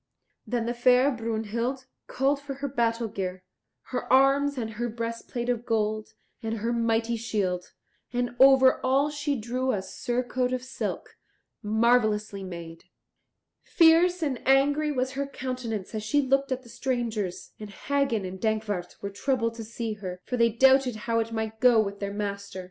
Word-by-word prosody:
Then 235 0 -1
the 240 - -1
fair 250 +3 +4
Brunhild 230 +2 -3 0.2
called 275 +2 0
for 280 -1 -6
her 280 +1 -4
battle 235 -3 0
gear, 185 -3 -5 0.5
her - - -3
arms, 275 +2 +4
and 225 -3 -3
her 240 +2 -3
breastplate 230 +1 -4
of 240 -2 0
gold 215 -2 -1 0.3
and 225 -1 -3
her 230 +3 -1
mighty 230 0 +1
shield; 200 -5 -2 0.4
and 245 0 -2
over 265 -1 +6
all 275 +3 +2
she 290 -2 -2
drew 250 +4 -1
a 195 -5 -2
surcoat 250 +4 -2
of 255 -1 -2
silk, 260 - -5 0.4
marvellously 215 -2 +2
made. 170 -3 -8 0.8
Fierce 340 +1 +4
and 270 -5 -2
angry 285 +3 +3
was 260 -2 -1
her 275 +1 -3
countenance 250 -7 -5
as 215 - -2
she 215 +7 +1
looked 275 0 +1
at 260 0 -2
the 240 - -15
strangers, 230 -8 -3
and 210 -1 -8
Hagen 255 -1 -1
and 185 0 -7
Dankwart 215 -5 -2
were 200 - -3
troubled 230 +2 0
to 230 -1 -7
see 225 0 -4
her, 185 -3 -7
for 250 - -2
they 235 -1 +4
doubted 265 +1 +4
how 230 -1 +1
it 225 0 -2
might 220 -1 -3
go 245 -2 +6
with 200 -2 -1
their 200 0 -3
master. 200 -1 -4
235 Hz, 165 wpm, -27 LUFS, 215-260 Hz, 0.8 s, over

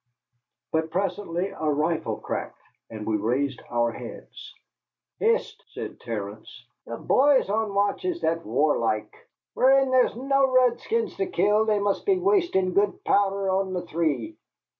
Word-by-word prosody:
But 160 0 0
presently 185 0 -2
a 155 -5 -3
rifle 155 +3 -1
cracked, - - -5 0.3
and 110 -1 -7
we 110 -1 0
raised 125 +5 -1
our 120 -1 +1
heads. - - -10 0.7
"Hist!" 460 +2 0
said - - -7
Terence, 110 +2 -7 0.2
"the 115 - -5
bhoys 275 0 +3
on 215 -1 -1
watch 200 - +1
is 360 -2 -2
that 165 +1 0
warlike! 115 -3 0 0.4
Whin 270 0 +4
there's 255 -3 +3
no 275 +2 +2
redskins 255 - +1
to 390 -2 -1
kill 215 - +2
they 215 -1 +2
must 200 - -1
be 390 -2 +4
wastin' 355 - +1
good 200 +1 +1
powdher 195 -1 +1
on 190 0 0
a 180 - -2
three." 170 - -2
195 Hz, 140 wpm, -25 LUFS, -, 0.7 s, Whin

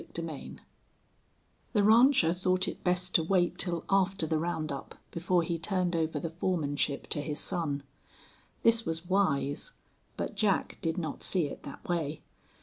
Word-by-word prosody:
CHAPTER 165 0 -6
III 145 - -8 1.2
The 210 -3 +3
rancher 225 -5 +6
thought 185 +1 +2
it - - -5
best 180 0 +1
to 165 - +4
wait 175 0 +1
till 170 -3 -2
after 195 -2 +2
the 160 0 0
round 160 -2 -2
up 140 - -6 0.2
before 175 +1 +1
he 165 0 -2
turned 180 0 0
over 160 -2 0
the 165 - -3
foremanship 155 -4 -1
to 145 - -1
his 150 0 -3
son. 145 -5 -1 0.8
This 230 0 +5
was 165 -1 -3
wise, 180 - +1 0.4
but - - -3
Jack 205 -3 0
did 165 +1 -1
not 160 -3 -3
see 180 -5 +2
it - - -8
that 140 - -10
way. 160 -4 -2
170 Hz, 160 wpm, -30 LUFS, 155-185 Hz, 1.2 s, rancher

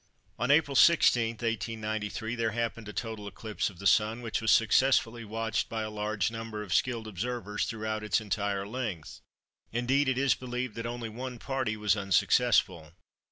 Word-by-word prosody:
On 120 +3 0
April 145 -1 +4
16, 120 -7 +5
1893, 110 -1 -3
there 115 -2 0
happened 115 -1 -3
a - - -5
total 110 -2 -5
eclipse 110 +1 -3
of 95 - -15
the 100 - -10
Sun, 110 +6 +3
which 115 0 -2
was 110 - 0
successfully 115 0 +3
watched 110 0 -2
by 110 -1 -2
a 110 - -5
large 105 -1 -1
number 115 -2 -5
of 95 - -4
skilled 115 -3 0
observers 105 +1 -3
throughout 110 -1 -3
its 105 -1 +2
entire 100 -2 -2
length. 105 -8 -5 0.5
Indeed 130 +4 +1
it 130 - 0
is 135 0 +3
believed 125 -2 -4
that 115 +2 -5
only 120 -1 -5
one 125 +3 -6
party 130 -3 -2
was 105 -1 +2
unsuccessful. 85 -4 +2
115 Hz, 165 wpm, -29 LUFS, 105-120 Hz, 0.5 s, 16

